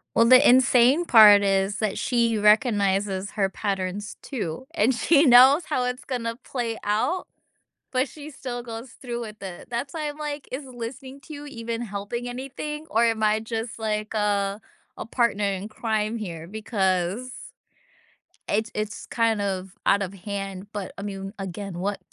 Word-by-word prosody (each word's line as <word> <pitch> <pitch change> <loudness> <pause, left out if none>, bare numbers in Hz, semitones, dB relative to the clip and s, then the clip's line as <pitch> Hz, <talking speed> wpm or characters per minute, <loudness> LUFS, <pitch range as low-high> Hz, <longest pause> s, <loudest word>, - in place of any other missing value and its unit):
Well, 230 - +5
the 255 +4 +7
insane 255 +5 +5
part 210 -7 +8
is 195 0 +1
that 215 -3 -1
she 235 -2 +1
recognizes 205 -3 +2
her 195 -2 +1
patterns 195 0 -3
too, 225 - -5
and 230 +6 +3
she 280 +6 +4
knows 265 +5 +8
how 250 - 0
it's 250 0 -3
gonna 230 -3 -3
play 235 -3 -3
out, 220 - 0 0.7
but 260 +1 +1
she 300 +2 -10
still 255 -4 -6
goes 230 +1 -7
through 240 -2 -4
with 215 -2 -8
it. 180 -2 -8
That's 245 +5 -3
why 305 -2 -2
I'm 295 +1 -7
like, 295 -2 -5
"Is 265 +3 -5
listening 260 +2 -8
to 310 - -11
you 290 0 -8
even 230 -3 -5
helping 220 +3 -4
anything, 275 +5 -6
or 230 +1 +3
am 225 -1 +1
I 215 0 +3
just 225 +1 -5
like, 215 -1 -2
uh, 205 -2 0 0.4
a - - -5
partner 230 -3 +1
in 200 0 -2
crime 220 0 -1
here?" 170 -6 -6
because 200 +1 -1 1.2
it's 220 +2 0
it's 215 0 -4
kind 225 -3 +1
of 190 -1 -3
out 200 - +4
of 195 -1 -3
hand, 195 0 -6
but 200 -3 -5
I 200 - -6
mean, 195 -1 -6
again, 195 -1 -6
what 195 +3 -2
220 Hz, 165 wpm, -25 LUFS, 200-250 Hz, 1.2 s, part